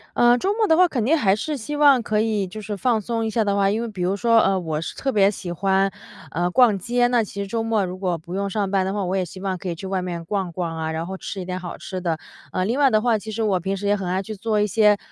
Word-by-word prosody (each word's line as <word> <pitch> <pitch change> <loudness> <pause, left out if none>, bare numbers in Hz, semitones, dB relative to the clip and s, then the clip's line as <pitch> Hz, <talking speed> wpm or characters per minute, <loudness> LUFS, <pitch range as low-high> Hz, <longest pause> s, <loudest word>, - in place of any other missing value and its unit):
呃， 240 0 +5
周 390 +9 0
末 435 -1 +1
的 320 - +5
话， 360 +1 +6
肯 240 -8 -2
定 315 +5 +4
还 195 -6 +3
是 300 +7 -3
希 280 +4 -5
望 285 -4 +5
可 210 -1 0
以 215 -3 0
就 215 +4 -8
是 210 0 -4
放 225 +3 +1
松 225 +2 -2
一 - - -1
下 225 0 +1
的 200 -1 0
话， 195 -1 +3
因 220 +3 0
为 235 - -3
比 195 -5 -7
如 185 +3 +1
说， 230 +2 +4
呃， 195 -2 +2
我 160 -2 -3
是 - - -6
特 270 - -1
别 200 -3 +4
喜 185 -3 -5
欢， 195 +2 +1 0.4
呃， 175 +2 0
逛 230 -1 +4
街， 245 +4 +1
那 240 -2 +2
其 200 0 -6
实 200 - -4
周 230 +2 -2
末 225 -3 +1
如 180 +1 -6
果 180 -3 -1
不 170 +3 -10
用 200 +1 -1
上 200 -1 -1
班 190 -1 +2
的 190 - -2
话， 205 -2 -1
我 185 +2 -1
也 185 - +1
希 180 +2 -9
望 190 -1 -2
可 180 - -5
以 170 - -3
去 190 - -8
外 190 -1 -1
面 170 -2 -5
逛 190 -2 -2
逛 170 -1 -3
啊， 160 0 -3
然 160 +1 -3
后 190 +1 -5
吃 195 +1 -6
一 - - -6
点 185 0 -4
好 175 -1 -7
吃 185 -1 -6
的。 165 -3 -1 0.3
呃， 185 - -1
另 240 +7 -1
外 275 -2 +5
的 215 -2 +3
话， 235 -2 +2
其 220 +2 -7
实 225 +1 -2
我 195 -4 +1
平 195 +3 -2
时 205 - -6
也 205 - +3
很 190 -3 -4
爱 185 +2 0
去 215 +2 -6
做 215 +1 -1
一 210 - +3
些， 210 0 +4
200 Hz, 340 characters per minute, -22 LUFS, 185-225 Hz, 0.4 s, 话